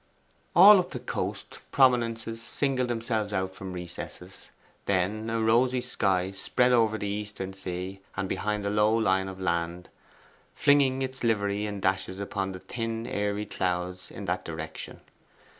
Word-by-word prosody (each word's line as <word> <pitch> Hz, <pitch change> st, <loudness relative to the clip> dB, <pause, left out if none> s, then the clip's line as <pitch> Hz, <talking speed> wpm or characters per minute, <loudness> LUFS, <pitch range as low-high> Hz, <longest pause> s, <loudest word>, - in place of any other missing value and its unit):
All 195 Hz, +4 st, +10 dB
up 180 Hz, 0 st, -2 dB
the 125 Hz, -, -5 dB
coast, 125 Hz, -, -4 dB
prominences 115 Hz, -4 st, +2 dB
singled 130 Hz, +1 st, 0 dB
themselves 115 Hz, -3 st, -2 dB
out 95 Hz, -1 st, -1 dB
from 95 Hz, 0 st, -7 dB
recesses. 90 Hz, -1 st, -8 dB, 0.4 s
Then 100 Hz, +4 st, 0 dB
a 115 Hz, 0 st, 0 dB
rosy 120 Hz, +3 st, +3 dB
sky 95 Hz, -5 st, 0 dB
spread 125 Hz, +6 st, +1 dB
over 115 Hz, -3 st, +3 dB
the 105 Hz, -, -4 dB
eastern 100 Hz, -2 st, -4 dB
sea 95 Hz, 0 st, -5 dB, 0.2 s
and 95 Hz, 0 st, -1 dB
behind 105 Hz, +1 st, -2 dB
the 100 Hz, -, 0 dB
low 105 Hz, +2 st, +3 dB
line 95 Hz, -3 st, +2 dB
of 95 Hz, 0 st, -7 dB
land, 85 Hz, -1 st, -2 dB, 0.7 s
flinging 135 Hz, -2 st, +4 dB
its 130 Hz, 0 st, -5 dB
livery 105 Hz, -2 st, +1 dB
in 100 Hz, -1 st, -5 dB
dashes 95 Hz, 0 st, -1 dB
upon 100 Hz, -1 st, -3 dB
the 95 Hz, -, -7 dB
thin 115 Hz, +2 st, -4 dB
airy 105 Hz, -1 st, -1 dB
clouds 90 Hz, -1 st, -2 dB
in -, -, -8 dB
that -, -, -1 dB
direction. 80 Hz, -1 st, -7 dB
105 Hz, 150 wpm, -28 LUFS, 95-115 Hz, 0.7 s, All